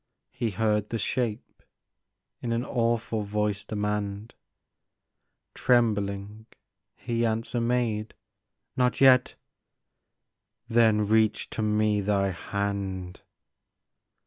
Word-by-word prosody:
" - - -57
he 115 - -2
heard 105 0 0
the 115 - -2
shape 115 0 -3 0.8
In 120 - -3
an 120 +2 -1
awful 115 -2 0
voice 105 0 -1
demand; 105 0 -3 1.2
Trembling 105 -3 0 0.5
he 120 -1 -2
answer 115 +1 -1
made, 115 -3 -1 0.3
" - - -56
Not 125 -2 +1
yet! 130 -2 +5 0.5
" - - -56
" 110 +3 -59
Then 110 -3 +3
reach 110 0 +2
to - - -3
me 105 -1 +2
thy 100 -1 +1
hand." 95 -1 -4
110 Hz, 105 wpm, -27 LUFS, 100-115 Hz, 1.2 s, yet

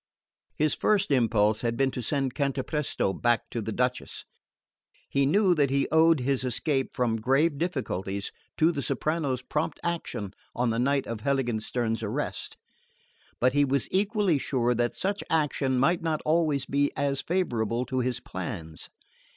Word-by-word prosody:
His 155 0 +2
first 200 -5 +1
impulse 110 -4 +3
had 115 -1 -1
been 135 -1 +2
to 125 - -4
send 135 +1 -1
Cantapresto 140 -5 -1
back 120 +2 +2
to 115 - -2
the 110 - -4
Duchess. 125 +3 -2 0.8
He 140 -1 +2
knew 190 +4 +4
that 145 -5 +2
he 140 0 +1
owed 160 -2 +5
his 130 0 0
escape 135 +2 -1
me 120 -3 +1
grave 140 +6 +2
difficulties 100 - -2 0.3
to 160 +2 +4
the 145 -4 -3
soprano's 140 -1 -1
prompt 150 +4 -2
action 160 - -3 0.2
on 120 -1 +1
the 115 - -1
night 135 +2 +1
of 115 -2 -4
Heiligenstern's 120 -3 -1
arrest; 105 -2 -4 0.8
but 130 +1 +3
he 145 0 +4
was 140 -1 +1
equally 200 -4 +2
sure 125 -3 +1
that 120 0 0
such 200 +1 -1
action 145 -4 +1
might 140 +7 +3
not 160 -2 -1
always 155 -4 +2
be 140 +1 +1
as 140 -1 0
favourable 120 - -1
to 130 0 -2
his 125 -1 0
plans. 85 -3 -6
135 Hz, 155 wpm, -27 LUFS, 120-155 Hz, 0.8 s, owed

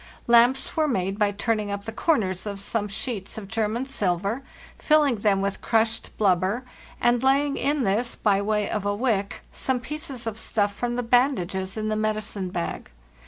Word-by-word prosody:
Lamps 240 +3 +4
were 315 -1 +2
made 195 -5 -1
by 210 -1 +4
turning 210 0 -1
up 200 0 -4
the 225 - -4
corners 215 - 0
of 200 -1 -4
some 205 +1 -2
sheets 205 -1 -4
of 210 -3 -6
German 225 +3 -1
silver, 200 -2 -1 0.4
filling 300 -6 +3
them 200 -1 +2
with 200 0 -2
crushed 225 0 +1
blubber, 195 +4 +2 0.4
and 240 0 +3
laying 275 +2 +3
in 290 -1 +1
this, 225 +4 0
by 200 -2 +2
way 210 0 0
of 210 - -2
a 205 0 0
wick, 205 -4 -1
some 260 -1 0
pieces 265 -1 -4
of 225 -1 -4
stuff 205 -2 0
from 240 +3 -2
the 245 - -1
bandages 210 -6 +1
in 215 0 -1
the 215 - 0
medicine 215 -3 -2
bag. 175 -2 -4
215 Hz, 175 wpm, -25 LUFS, 200-245 Hz, 0.4 s, Lamps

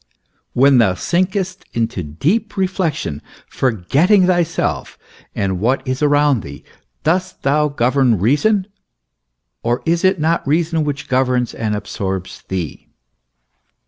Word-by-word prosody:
When 135 0 +5
thou 95 -6 +3
sinkest 185 - -1
into 115 -4 -1
deep 160 - -1
reflection, 175 - -1 0.3
forgetting 135 - +2
thyself 175 -3 0 0.4
and 95 -3 -1
what 125 +7 0
is 130 +2 -2
around 145 -4 +3
thee, 70 -3 -10 0.4
dost 185 +3 -1
thou 150 +2 +2
govern 130 -3 +2
reason, 150 - +2 1.0
or 120 +2 -1
is 170 0 +1
it 185 -2 +3
not 160 -1 0
reason 160 +1 +1
which 145 -2 -4
governs 125 -2 +1
and 110 -2 -2
absorbs 95 -2 -4
thee? 90 -5 -5
140 Hz, 115 wpm, -18 LUFS, 115-170 Hz, 1.0 s, When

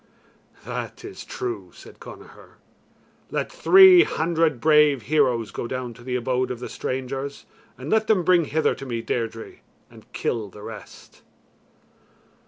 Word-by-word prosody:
"That - - -6
is - - -9
true," 385 -7 -6
said - - -15
Connachar; - - -14 0.7
"let - - -3
three 380 -7 +7
hundred 160 - 0
bravo 150 0 +4
heroes 125 -3 0
go - - -5
down 125 -1 -5
to 120 - -16
the 125 0 -3
abode 125 +1 -1
of 125 - -5
the 125 - -7
strangers, 135 +2 -5 0.3
and 130 +5 -7
let 220 0 +2
them 200 -5 +3
bring 175 -1 +3
hither 155 +2 +1
to 135 - -9
me 115 -2 -4
Deirdre, 115 -1 -4 0.3
and - - -17
kill 110 -4 -3
the 105 +2 -13
rest." 110 -1 -12
135 Hz, 145 wpm, -23 LUFS, 120-165 Hz, 0.7 s, three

